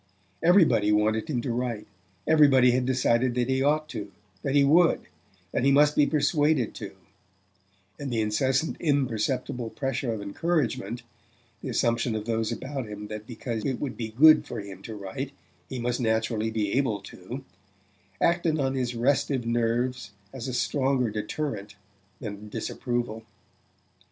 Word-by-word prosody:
Everybody 160 - +5
wanted 110 +3 +1
him 125 -5 0
to 120 - -2
write 120 -3 -2 0.4
everybody 140 -5 +6
had 125 0 +1
decided 125 -1 +2
that 125 -1 +1
he 130 0 +1
ought 150 +2 +2
to, 100 -1 -6 0.3
that 135 0 -1
he 140 - +6
would, 165 +4 +4 0.5
that - - 0
he 140 - +4
must 150 +2 +5
be 145 - +4
persuaded 145 -3 +2
to; - - -8 1.0
and 140 -2 -4
the 115 - 0
incessant 130 +8 +1
imperceptible 125 -4 0
pressure 135 -1 -2
of 110 - -3
encouragement 120 - -1 0.6
the - - -5
assumption 115 0 +1
of 105 -1 -3
those 115 -1 -1
about 130 +1 -4
him 105 0 -7
that 105 0 -7
because 115 -2 -4
it 130 -3 -1
would 135 -4 -3
be 115 - -4
good 155 +8 +7
for - - -5
him 100 -2 -9
to 110 +2 -7
write 105 +8 -5 0.4
he 130 - -5
must 120 +1 -1
naturally 110 -1 0
be 110 -2 -1
able 125 -6 +1
to 100 +7 -8 0.8
acted 170 -2 +2
on 135 -1 0
his 125 -2 -2
restive 135 +1 +1
nerves 115 -1 -1 0.2
as 130 -2 -6
a 130 - -3
stronger 130 -3 +1
deterrent 105 -1 -4 0.4
than 105 -1 -7
disapproval. 115 0 -3
120 Hz, 150 wpm, -27 LUFS, 110-140 Hz, 1.0 s, good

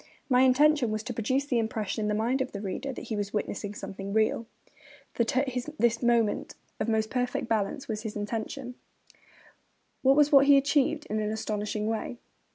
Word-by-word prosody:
My 250 -1 +5
intention 265 0 +4
was 215 0 -2
to 245 +1 -5
produce 260 +5 0
the 250 -4 +1
impression 220 -1 -2
in 210 - 0
the 210 - 0
mind 240 +5 0
of 260 - -3
the 200 - -4
reader 205 +7 -4
that 255 - -7
he 220 - -1
was 205 0 -3
witnessing 205 0 -3
something 195 -1 -6
real.' 220 +1 +1 0.7
That, 235 +3 0
at 270 +1 +2
his 250 +2 -4 0.3
moment 235 -3 +1 0.2
of 230 - -1
most 220 -1 0
perfect 245 -1 -1
balance, 225 +4 -1
was 215 -1 -3
his 220 -2 -6
intention; 225 +5 -4 1.3
that 265 0 +6
was 295 +1 +4
what 275 -1 +7
he 285 -1 +8
achieved 285 +2 +2
in 215 - -2
an 210 -1 -1
astonishing 210 -1 -2
way. 225 +2 -3
230 Hz, 185 wpm, -28 LUFS, 215-260 Hz, 1.3 s, he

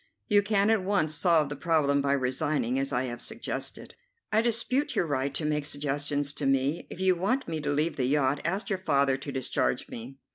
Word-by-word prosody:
"You 205 -3 +5
can 205 0 +2
at 220 -4 +2
once 185 -6 +1
solve 160 -3 +3
the 145 - -4
problem 145 -2 +2
by 140 0 +1
resigning, 130 -1 0
as 135 0 -2
I 125 - +1
have 120 -2 -5
suggested." - - -6 0.4
"I 220 0 +4
dispute 240 +4 0
your - - +2
right 140 -2 -1
to 155 - +1
make 150 -1 0
suggestions 145 0 -1
to 145 - -2
me. 135 +4 +1
If - - -8
you 190 -1 +3
want 205 +10 0
me 160 -2 -3
to 145 - -2
leave 150 +3 0
the 130 - +1
yacht, 140 0 +1
ask 190 +7 -1
your 190 - 0
father 140 -6 +2
to 140 +1 -6
discharge 120 - -1
me." 120 +4 -8
145 Hz, 210 wpm, -28 LUFS, 135-185 Hz, 0.4 s, You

